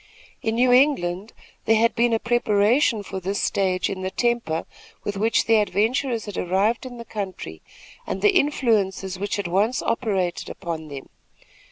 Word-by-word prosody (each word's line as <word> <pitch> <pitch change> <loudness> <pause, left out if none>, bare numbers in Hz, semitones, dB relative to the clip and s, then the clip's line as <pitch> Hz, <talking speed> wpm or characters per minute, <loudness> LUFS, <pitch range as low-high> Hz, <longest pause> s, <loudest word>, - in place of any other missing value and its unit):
In 225 0 -1
New 250 +1 +3
England, 225 -7 +2 0.3
there 225 - +4
had 230 +1 +3
been 235 +1 +2
a 225 - +3
preparation 225 0 +2
for 190 -1 -6
this 195 +2 -3
stage 185 -2 0
in 190 -1 -5
the 185 - -2
temper 235 -8 -1 0.4
with 205 - -3
which 220 +3 +1
the 225 0 +4
adventurers 220 +5 0
had 205 -3 -5
arrived 200 +8 0
in 245 -1 -10
the 235 - -8
country, 190 - -6 0.5
and 190 - -4
the 205 - +4
influences 200 -9 +1
which 205 +1 -2
at 200 -3 -3
once 205 +8 +1
operated 195 -7 -1
upon 160 -2 -6
them. 140 -2 -9
205 Hz, 165 wpm, -23 LUFS, 190-235 Hz, 0.5 s, there